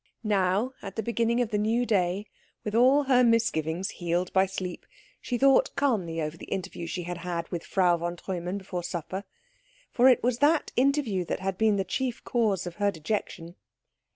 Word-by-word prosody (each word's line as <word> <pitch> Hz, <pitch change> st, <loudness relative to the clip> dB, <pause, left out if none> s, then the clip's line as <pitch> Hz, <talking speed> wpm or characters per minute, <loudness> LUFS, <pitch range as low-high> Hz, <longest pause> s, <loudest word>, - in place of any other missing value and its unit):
Now, 205 Hz, +3 st, +1 dB
at 195 Hz, -, -8 dB
the 220 Hz, -, -2 dB
beginning 235 Hz, +1 st, +1 dB
of 240 Hz, -, -1 dB
the 210 Hz, -, +1 dB
new 225 Hz, +4 st, +1 dB
day, 195 Hz, -2 st, +1 dB, 0.4 s
with 210 Hz, -, -4 dB
all 260 Hz, +5 st, +5 dB
her 255 Hz, -2 st, +4 dB
misgivings 195 Hz, -7 st, +1 dB
healed 175 Hz, +1 st, -2 dB
by 190 Hz, 0 st, +4 dB
sleep, 185 Hz, -1 st, -6 dB, 0.3 s
she 245 Hz, -, -2 dB
thought 270 Hz, +1 st, +4 dB
calmly 190 Hz, -12 st, 0 dB
over 155 Hz, 0 st, -3 dB
the -, -, -11 dB
interview 185 Hz, -3 st, -4 dB
she 175 Hz, +2 st, -4 dB
had 175 Hz, 0 st, -5 dB
had 170 Hz, -1 st, -3 dB
with 170 Hz, -2 st, -4 dB
Frau 180 Hz, -3 st, +2 dB
von 175 Hz, +1 st, -3 dB
Treumann 180 Hz, +1 st, -4 dB
before 190 Hz, -2 st, -5 dB
supper; 175 Hz, +3 st, -5 dB, 0.7 s
for 250 Hz, +2 st, +5 dB
it 255 Hz, -, +4 dB
was 245 Hz, 0 st, +1 dB
that 300 Hz, +3 st, +3 dB
interview 255 Hz, -8 st, +1 dB
that -, -, -3 dB
had 190 Hz, 0 st, -2 dB
been 215 Hz, +1 st, +3 dB
the 195 Hz, -, 0 dB
chief 245 Hz, +6 st, -3 dB
cause 210 Hz, -7 st, 0 dB
of 175 Hz, -1 st, -7 dB
her 205 Hz, -1 st, +2 dB
dejection. 170 Hz, -1 st, -4 dB
195 Hz, 185 wpm, -27 LUFS, 175-235 Hz, 0.7 s, all